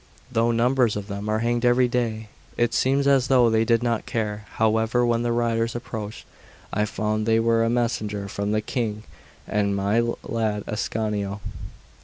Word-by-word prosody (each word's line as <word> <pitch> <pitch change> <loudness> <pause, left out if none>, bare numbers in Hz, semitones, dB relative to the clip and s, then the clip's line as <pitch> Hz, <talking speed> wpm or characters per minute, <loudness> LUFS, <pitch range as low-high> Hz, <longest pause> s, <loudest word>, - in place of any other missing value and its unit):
Though 115 -1 +2
numbers 120 0 +2
of 105 -1 -4
them 100 +1 -5
are 110 +1 +1
hanged 120 0 0
every 125 +1 +4
day, 115 -3 -2 0.3
it 120 0 +1
seems 135 +3 +2
as 135 -2 +4
though 125 -3 +4
they 110 0 +3
did 115 +1 +2
not 115 -2 -1
care. 105 -2 -3
However, 110 +2 +2
when 120 -1 +1
the 120 0 0
riders 115 0 0
approached, 110 -3 -6 0.5
I 105 - +1
found 110 0 -2
they 115 0 +4
were 115 0 +3
a 115 - +1
messenger 110 -4 -1
from 100 0 -3
the 110 0 +1
King 110 -2 -3 0.4
and 100 -1 0
my 100 +3 +1 0.2
lad 110 -3 -1
Ascanio. 105 -2 -2
115 Hz, 170 wpm, -24 LUFS, 105-120 Hz, 0.5 s, every